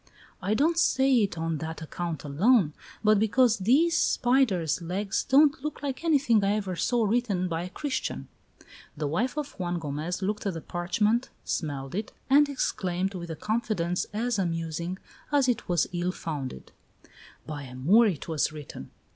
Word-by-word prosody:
"I 200 +3 0
don't 325 +7 +2
say 265 -3 +3
it 200 -6 +1
on 165 -1 -2
that 160 0 -5
account 170 0 -4
alone, 165 - +3 0.3
but 215 -1 +5
because 225 +1 +3
these 290 - +3
spider's 230 - +2
legs 195 +4 -2
don't 285 +1 +4
look 300 -1 -5
like 275 +1 -3
anything 275 -10 +3
I 200 +1 +2
ever 195 -4 -2
saw 235 +5 +1
written 205 -4 0
by 165 -1 -2
a - - -7
Christian." 280 +8 -3 0.7
The 150 - -2
wife 235 - -1
of 295 -1 -3
Juan 175 -1 -1
Gomez 160 +4 -4
looked 210 +1 -2
at 190 - -2
the 165 - -5
parchment, 210 +9 0 0.2
smelled 140 -4 -3
it, 210 +3 -4 0.2
and 290 +1 +6
exclaimed, 190 -8 -1
with 170 -2 -6
a 160 - -4
confidence 205 -3 -1
as 225 +1 -1
amusing 170 0 -2 0.3
as 285 -3 +3
it 245 -4 -1
was 175 -3 +3
ill 175 +1 0
founded: 145 - -6 0.7
"By 150 -2 -6
a 125 -1 -10
Moor 195 - +5
it 175 -8 -3
was 160 -2 0
written!" 150 - -9
195 Hz, 165 wpm, -27 LUFS, 165-245 Hz, 0.7 s, and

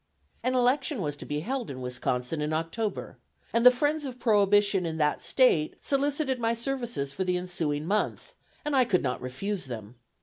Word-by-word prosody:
An 255 +1 0
election 255 +2 +2
was 145 -1 -2
to - - -8
be 145 0 -2
held 255 +5 -3
in 130 -2 -6
Wisconsin 125 +3 -2
in 150 +1 -1
October, 165 +7 -3 0.3
and 230 - +3
the 250 - +11
friends 295 +5 0
of 260 -3 -5
prohibition 205 -4 +3
in 160 -2 -3
that 150 -1 +1
State 210 - +3
solicited 280 -1 0
my 230 0 +1
services 240 - -2
for 190 - -1
the 180 -1 0
ensuing 160 -5 -2
month, 215 - -1 0.3
and 295 -1 0
I 260 - +6
could 200 -7 +1
not 125 -2 -2
refuse 180 +10 -3
them. 115 -2 -8
205 Hz, 180 wpm, -28 LUFS, -, 0.3 s, the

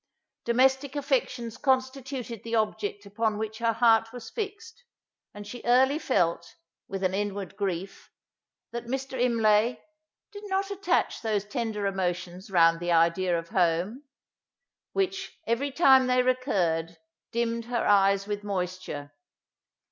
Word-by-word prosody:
Domestic 265 +3 +2
affections 255 -5 -1
constituted 260 -3 -1
the 230 0 -2
object 210 -2 -1
upon 215 +1 -1
which 220 0 -4
her 230 -1 +1
heart 225 -1 +4
was 245 -1 -9
fixed; 450 +2 -6 0.5
and 205 0 -9
she 240 +4 -8
early 265 +5 +4
felt, 175 - 0 0.3
with 195 0 -5
an 185 0 +1
inward 200 -1 -3
grief, 195 -2 -4 0.6
that 235 0 -6
Mr. 265 0 -3
Imlay 230 -1 +3 0.5
"did 410 0 -9
not 390 +1 -1
attach 395 0 0
those 210 -3 -1
tender 220 -2 -3
emotions 180 -1 -3
round 165 -3 +4
the 175 0 -2
idea 170 +2 +3
of 165 0 -6
home," 180 - +1 0.9
which, 390 0 -2
every 250 +4 0
time 265 -3 +5
they 250 0 +3
recurred, 180 - 0 0.3
dimmed 230 0 -1
her 240 -1 -1
eyes 195 -1 +4
with 205 0 -4
moisture. 185 -7 -4
225 Hz, 130 wpm, -27 LUFS, 195-255 Hz, 0.9 s, time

